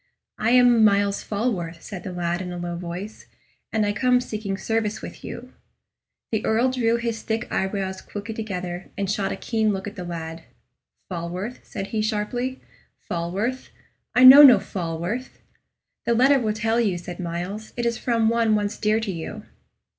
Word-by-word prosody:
"I 220 - +1
am 245 -2 +6
Myles 200 -1 +3
Falworth," 195 -7 -3
said 195 -4 -7
the 185 - -6
lad, 175 0 -2
in 180 -1 -5
a 175 - -5
low 175 0 -4
voice; 180 +5 -7 0.4
"and 220 -1 +1
I 205 - 0
come 250 +3 +3
seeking 215 -5 -4
service 220 +1 -1
with - - -9
you." 250 +2 -8 0.8
The 220 -2 0
Earl 235 +4 +2
drew 235 -3 +1
his 235 -1 -2
thick 220 +1 -2
eyebrows 190 -1 -2
quickly 205 +2 -7
together, 185 -5 -5
and 200 -1 -1
shot 200 -2 -1
a - - -2
keen 220 -2 0
look 195 -1 -3
at 205 - -7
the 180 - -6
lad. 165 -1 -6 0.7
"Falworth?" 180 +6 -5
said 195 - -6
he, 220 - -1
sharply 235 +4 -2 0.5
"Falworth? 195 +10 -2 0.5
I 250 - +6
know 265 +3 +12
no 275 -4 +10
Falworth!" 180 +8 -4 0.7
"The 235 - +3
letter 270 +4 +5
will 215 -3 0
tell 225 +2 0
you," 200 -6 +1
said 175 +1 -8
Myles. 180 +5 -5
"It 240 - -1
is 235 -1 0
from 230 -2 +1
one 230 -1 +3
once 205 0 -1
dear 215 +1 +2
to 220 -3 -3
you." 165 -3 -6
210 Hz, 175 wpm, -24 LUFS, 180-230 Hz, 0.8 s, know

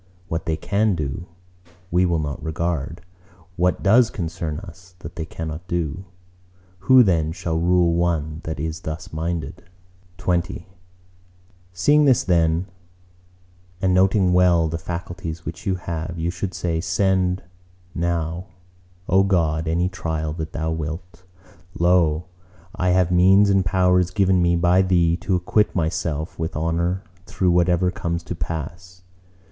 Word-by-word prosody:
What 80 0 -3
they 80 -1 0
can 100 +4 +1
do, 80 +2 -4 0.6
we 90 +1 +3
will 85 -1 +1
not 75 -2 -4
regard: 85 0 -3 0.5
what 90 +1 0
does 115 +4 +5
concern 85 - -4
us, 90 -1 -14
that - - -10
they 80 - -4
cannot 80 +2 -6
do. 85 +1 -3 0.7
Who 125 +6 +6
then 80 -6 +1
shall 80 -1 -2
rule 85 0 +3
one 80 -2 -1
that 80 -2 -5
is 80 +2 -3
thus 80 0 -7
minded? 80 +1 -4 0.5
XX 90 +1 -1 1.1
Seeing 145 +12 +3
this 130 -4 +4
then, 85 0 +2 1.1
and 95 0 +1
noting 95 0 +3
well 90 -2 +4
the 80 +1 -3
faculties 85 0 -6
which 85 +7 -7
you 95 - +1
have, 85 -1 -5
you 85 +1 -1
should 90 0 -5
say,—"Send 90 +2 0 0.5
now, 85 +1 -2 0.6
O 95 +2 +4
God, 80 -5 +1
any 85 +3 +1
trial 80 -4 -3
that 80 -1 -5
Thou 80 0 -2
wilt; 80 +3 -6 0.5
lo, 85 -3 +3 0.5
I 90 - 0
have 90 -1 +3
means 95 +3 +5
and 95 -1 +3
powers 90 0 +2
given 95 -1 +2
me 85 0 +3
by 90 +2 +4
Thee 85 -3 +2
to 95 0 -1
acquit 105 +4 +1
myself 80 -2 -2
with 80 0 -3
honour 85 +4 -1 0.2
through 90 -2 +1
whatever 90 +1 +2
comes 85 -1 -3
to 90 - -5
pass!" 85 +3 -6
85 Hz, 140 wpm, -22 LUFS, 80-90 Hz, 1.1 s, Who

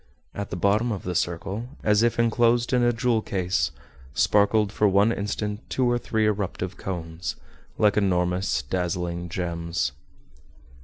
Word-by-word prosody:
At 100 0 -5
the - - -4
bottom 105 +6 +2
of 100 - -4
the 90 - -3
circle, 95 +7 -2 0.2
as 105 0 +4
if 120 0 +2
enclosed 120 +1 +2
in 125 - +4
a 120 0 +4
jewel 120 -1 +1
case, 90 -9 0 0.5
sparkled 105 0 +3
for 105 - +2
one 100 +3 +4
instant 105 0 -2
two 130 - +1
or 120 0 +2
three 110 -2 0
eruptive 95 -3 -2
cones, 85 -2 -5 0.4
like 105 -1 +3
enormous 90 -7 +1
dazzling 85 +2 -2
gems. 85 -4 -2
100 Hz, 145 wpm, -25 LUFS, 90-110 Hz, 0.5 s, as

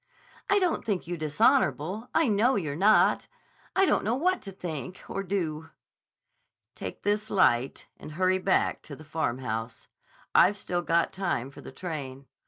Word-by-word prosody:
"I 405 - +4
don't 365 -4 +1
think 200 -5 -2
you 175 +1 -4
dishonorable. 185 - +1
I 320 -3 +4
know 225 +5 +3
you're 155 -7 -2
not. 205 +6 +4 0.5
I 385 - +5
don't - - +2
know 225 +3 +1
what 365 +7 +1
to 195 - -9
think 180 -1 -6
or 195 - -3
do." 170 -5 -3 1.0
"Take - - -7
this 210 +1 0
light 130 -9 +2
and 155 - -10
hurry 185 +2 +2
back 190 0 +1
to 145 - -6
the 155 - -13
Farmhouse. 125 -7 -3 0.5
I've 200 +4 +5
still 175 -3 -2
got 170 0 +1
time 175 -9 -2
for - - -12
the - - -10
train. 140 -4 -6
180 Hz, 160 wpm, -27 LUFS, 150-210 Hz, 1.0 s, I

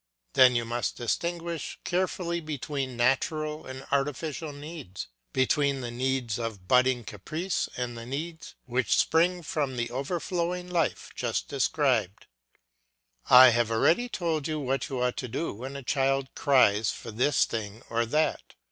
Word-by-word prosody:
Then 130 -2 +7
you 120 -1 +1
must 120 -3 -2
distinguish 170 +6 -3
carefully 180 -1 -1
between 140 -4 -4
natural 150 +5 0
and 130 +1 -8
artificial 145 +2 -1
needs, 145 - -8 0.3
between 135 +1 +2
the 120 -1 -4
needs 125 -2 -1
of 110 -5 -5
budding 125 +1 +3
caprice 155 - -3
and 125 -1 -3
the 115 0 -8
needs 160 +5 -5
which 125 -3 +1
spring 175 +2 +3
from 145 -5 -2
the 120 0 -2
overflowing 175 +6 -2
life 165 -5 -1
just - - -2
described. 130 - +1 1.0
I 130 0 +10
have 120 -1 +2
already 165 - +2
told 165 -8 -1
you 155 -1 -2
what 135 -1 -1
you 130 -2 -3
ought 125 0 0
to 125 - -3
do 160 +8 -3
when 130 +6 -7
a 140 - -6
child 135 +1 0
cries 110 -7 +4
for 115 - -6
this 125 +6 +3
thing 110 0 -5
or 115 0 0
that. 155 +6 0
135 Hz, 150 wpm, -28 LUFS, 120-155 Hz, 1.0 s, I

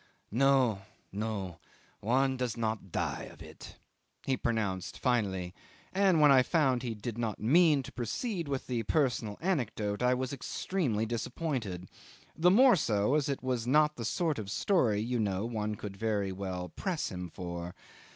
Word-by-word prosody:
"No, 130 -4 +3 0.3
no; 100 -4 -4 0.4
one 130 +4 +2
does 125 -3 -2
not 110 -4 -2
die - - -2
of - - -12
it," - - -12 0.5
he 135 - +1
pronounced 105 -7 -2
finally, 95 -8 0 0.4
and 190 -3 +4
when 150 -1 +7
I 130 -1 +7
found 130 -4 +2
he 120 -3 -3
did 115 +2 -5
not 110 -4 -2
mean 150 +4 +4
to - - -9
proceed 170 - -3
with 135 -2 -3
the 120 -2 -1
personal 115 -5 0
anecdote, 115 - -1
I 125 +1 +3
was 130 +1 -3
extremely 135 - -1
disappointed; 120 - -3 0.5
the 170 +3 +4
more 245 +5 +7
so 105 - +1
as 150 -2 +2
it 140 - -3
was 125 -2 -1
not 150 +3 +4
the 120 - -5
sort 155 +4 0
of 100 -3 -6
story, 115 - +2
you 120 +2 -1
know, 100 -1 0
one 110 -2 -2
could 100 -1 -7
very 105 -2 0
well 95 -2 -4
press 175 - -3
him 90 -1 -5
for. 85 0 -6
120 Hz, 160 wpm, -31 LUFS, 105-140 Hz, 0.5 s, when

